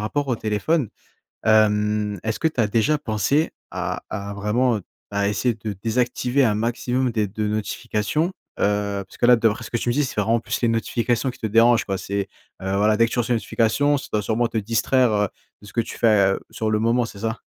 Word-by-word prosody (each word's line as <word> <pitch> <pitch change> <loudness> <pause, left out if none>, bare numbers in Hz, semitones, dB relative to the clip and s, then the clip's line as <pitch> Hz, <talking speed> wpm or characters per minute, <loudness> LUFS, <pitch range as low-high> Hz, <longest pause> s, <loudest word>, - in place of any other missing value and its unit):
rapport 140 +7 -1
au 125 - +1
téléphone. 110 +6 0 0.6
Hem, 105 -1 +2
est-ce 110 0 -2
que 160 - +3
tu 130 -7 -1
as 105 - +2
déjà 115 +8 +2
pensé 140 - 0 0.2
à - - -3
à 100 -1 -5
vraiment, 110 +4 +1
heu, - - -7 0.3
à 100 0 +1
essayer 115 +3 0
de 105 -2 -5
désactiver 125 +3 +1
un 105 - +2
maximum 125 +3 0
des 105 -2 0
de 105 +2 -3
notifications? 110 - -1 0.3
Heu, 100 -1 0
puisque - - -12
là 120 0 +7
d'après 110 -1 +1
ce - - -9
que 120 - 0
tu 120 - -2
me - - +2
dis 150 - +2
c'est 115 - -4
vraiment 115 +3 +2
plus - - -3
les 120 - +3
notifications 120 +2 0
qui - - -17
te 110 - -2
dérangent 115 +2 +4
quoi. 95 -1 -2
C'est, 100 0 -3 0.3
heu, 95 +1 -1
voilà 105 +1 +3
dès 115 0 +4
que - - -10
tu - - -3
reçois 120 +1 +1
une - - +2
notification, 140 +7 +1
ça - - -8
doit 105 - +2
sûrement 115 +3 0
te 115 - -4
distraire, 115 +3 +2
heu, 105 -1 +1 0.3
de 105 - -13
ce - - -13
que 115 - +2
tu - - -8
fais, 100 -4 +4
heu, - - -6
sur 110 -1 -2
le 110 - +2
moment 115 +2 +2
c'est 100 -3 -10
ça? 115 +1 -3
110 Hz, 230 wpm, -22 LUFS, 105-120 Hz, 0.6 s, là